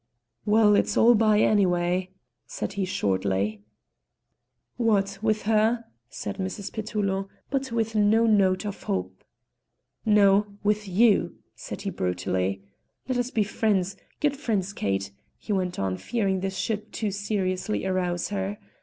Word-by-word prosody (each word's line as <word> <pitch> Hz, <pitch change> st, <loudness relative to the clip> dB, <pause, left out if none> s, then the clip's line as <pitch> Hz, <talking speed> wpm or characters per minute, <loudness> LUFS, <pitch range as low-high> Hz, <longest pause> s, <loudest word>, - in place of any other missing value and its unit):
"Well, 210 Hz, 0 st, +5 dB
it's -, -, +1 dB
all 235 Hz, +1 st, +7 dB
by, 215 Hz, -1 st, +4 dB
anyway," 180 Hz, -2 st, +2 dB, 0.4 s
said 195 Hz, -, -4 dB
he 200 Hz, -1 st, -1 dB
shortly. 100 Hz, -, -1 dB, 1.2 s
"What, 200 Hz, -4 st, +1 dB
with 215 Hz, -1 st, +1 dB
her?" 225 Hz, +2 st, +2 dB, 0.2 s
said 200 Hz, +7 st, -6 dB
Mrs. 190 Hz, +1 st, -4 dB
Petullo, 200 Hz, -3 st, -2 dB, 0.2 s
but 270 Hz, -2 st, -1 dB
with 225 Hz, -1 st, -1 dB
no 215 Hz, +2 st, +4 dB
note 200 Hz, -3 st, +3 dB
of 205 Hz, -1 st, -5 dB
hope. 95 Hz, 0 st, -3 dB, 0.8 s
"No, 205 Hz, -1 st, +4 dB
with 210 Hz, 0 st, +1 dB
you," 205 Hz, +3 st, +3 dB, 0.2 s
said -, -, -7 dB
he -, -, -2 dB
brutally. 90 Hz, +1 st, -2 dB, 0.4 s
"Let 255 Hz, -1 st, 0 dB
us 245 Hz, 0 st, -1 dB
be 220 Hz, -4 st, +1 dB
friends, 195 Hz, -2 st, 0 dB, 0.2 s
good 295 Hz, -1 st, +1 dB
friends, 205 Hz, -8 st, -2 dB
Kate," 100 Hz, -, -2 dB, 0.3 s
he 210 Hz, -, -4 dB
went 185 Hz, -2 st, -1 dB
on, 95 Hz, -1 st, -1 dB
fearing 195 Hz, -, -1 dB
this 190 Hz, 0 st, -3 dB
should 215 Hz, -1 st, -3 dB
too 215 Hz, -3 st, -2 dB
seriously 200 Hz, -1 st, -2 dB
arouse 180 Hz, -2 st, -1 dB
her. 200 Hz, 0 st, -3 dB
200 Hz, 135 wpm, -26 LUFS, 185-215 Hz, 1.2 s, all